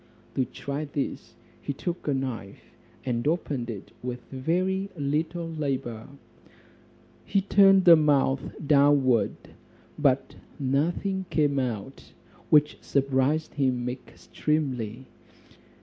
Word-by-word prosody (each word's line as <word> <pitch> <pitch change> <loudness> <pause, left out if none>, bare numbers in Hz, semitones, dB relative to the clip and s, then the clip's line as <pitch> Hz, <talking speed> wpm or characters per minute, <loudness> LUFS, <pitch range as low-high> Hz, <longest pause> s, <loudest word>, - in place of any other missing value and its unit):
To 130 - +1
try 140 +5 -5
this, 140 -1 -4 0.3
he 140 - -3
took 170 +5 -5
a 145 - +2
knife, 125 -7 -6 0.3
and 120 +1 -1
opened 145 -7 -1
it 105 -4 -7
with 125 0 -5
very 185 +8 -1
little 160 +4 -1
labour. 135 -8 -3 1.2
He 200 - +1
turned 195 -1 +5
the 170 -2 +10
mouth 140 -3 +3 0.2
downward, 140 -4 +4 0.6
but - - +1 0.2
nothing 175 +8 0
came 145 -3 +2
out; 125 0 -5 0.4
which 150 -1 +4
surprised 140 +3 +1
him 130 -3 0
extremely. 125 -1 -3
140 Hz, 100 wpm, -27 LUFS, 130-155 Hz, 1.2 s, the